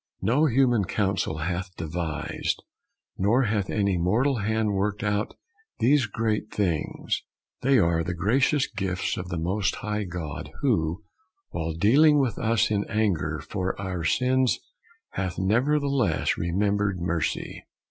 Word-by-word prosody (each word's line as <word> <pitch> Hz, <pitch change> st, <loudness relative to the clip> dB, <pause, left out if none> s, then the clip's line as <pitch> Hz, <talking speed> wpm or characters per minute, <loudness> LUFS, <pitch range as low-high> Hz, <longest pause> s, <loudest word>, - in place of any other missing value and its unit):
No 130 Hz, +10 st, +3 dB
human 120 Hz, -5 st, +3 dB
counsel 95 Hz, -5 st, -1 dB
hath 90 Hz, +1 st, -3 dB
devised, 80 Hz, -1 st, -3 dB, 0.6 s
nor 115 Hz, +8 st, +3 dB
hath 105 Hz, -4 st, 0 dB
any 100 Hz, -4 st, +1 dB
mortal 120 Hz, +10 st, +2 dB
hand 110 Hz, 0 st, 0 dB
worked 105 Hz, +1 st, -1 dB
out 105 Hz, 0 st, -1 dB, 0.4 s
these 135 Hz, 0 st, +3 dB
great 110 Hz, 0 st, -1 dB
things. 90 Hz, -7 st, -1 dB, 0.4 s
They 135 Hz, +1 st, +4 dB
are 85 Hz, -5 st, +2 dB
the 90 Hz, +1 st, -3 dB
gracious 130 Hz, -, +2 dB
gifts 95 Hz, -3 st, -2 dB
of 90 Hz, 0 st, -6 dB
the 85 Hz, -, -3 dB
Most 95 Hz, +5 st, 0 dB
High 105 Hz, -1 st, -3 dB
God, 85 Hz, -5 st, -6 dB
who, 80 Hz, +5 st, +1 dB, 0.5 s
while 80 Hz, -1 st, -3 dB
dealing 140 Hz, -, +5 dB
with 135 Hz, -5 st, 0 dB
us 110 Hz, -1 st, +2 dB
in 100 Hz, -1 st, +1 dB
anger 80 Hz, -9 st, 0 dB
for 95 Hz, -1 st, -2 dB
our 95 Hz, -3 st, -3 dB
sins, 130 Hz, +7 st, +2 dB, 0.5 s
hath 95 Hz, -2 st, -3 dB
nevertheless 135 Hz, +5 st, +1 dB
remembered 100 Hz, +2 st, 0 dB
mercy. 85 Hz, -4 st, -2 dB
100 Hz, 130 wpm, -26 LUFS, 90-115 Hz, 0.6 s, dealing